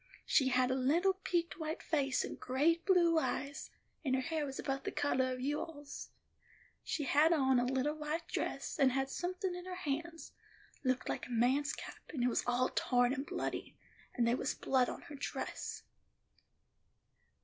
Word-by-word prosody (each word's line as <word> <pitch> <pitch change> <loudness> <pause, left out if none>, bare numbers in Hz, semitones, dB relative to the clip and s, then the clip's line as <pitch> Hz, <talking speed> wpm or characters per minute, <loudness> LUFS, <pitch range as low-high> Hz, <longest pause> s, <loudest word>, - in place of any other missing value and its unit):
She 270 - +4
had 255 0 +3
a - - +2
little 320 +9 +3
peaked 345 -3 -1
white 315 0 -3
face 275 -4 +1
and - - -7
great 320 +8 +1
blue 340 -4 +5
eyes, 280 -2 -3 0.3
and 260 -3 +2
her 260 - +1
hair 305 +2 -1
was 270 - -6
about 270 -1 -2
the - - -2
coloh 260 -2 +1
of 255 0 -4
you 290 +3 0
all's. 290 -3 -7 0.7
She 300 - -2
had 300 +4 +4
on 265 -5 +4
a 245 - +1
little 265 +3 +1
white 310 +2 -3
dress, - - -3
and 265 -3 +5
had 270 0 0
somethin' 365 +2 -2
in 355 0 -7
her 370 0 -5
hands—looked 310 -5 -4
like - - -3
a - - -11
man's 260 +5 +2
cap, - - -8
and 265 -6 -2
it 250 - +4
was - - +1
all 245 +1 +2
torn 245 0 +2
and 275 +2 -4
bloody; - - -4 0.4
and 235 -2 +2
there 240 +2 +3
was - - -1
blood 255 -2 +2
on - - -6
her - - -10
dress. 275 - -4
280 Hz, 180 wpm, -35 LUFS, 260-325 Hz, 0.7 s, blue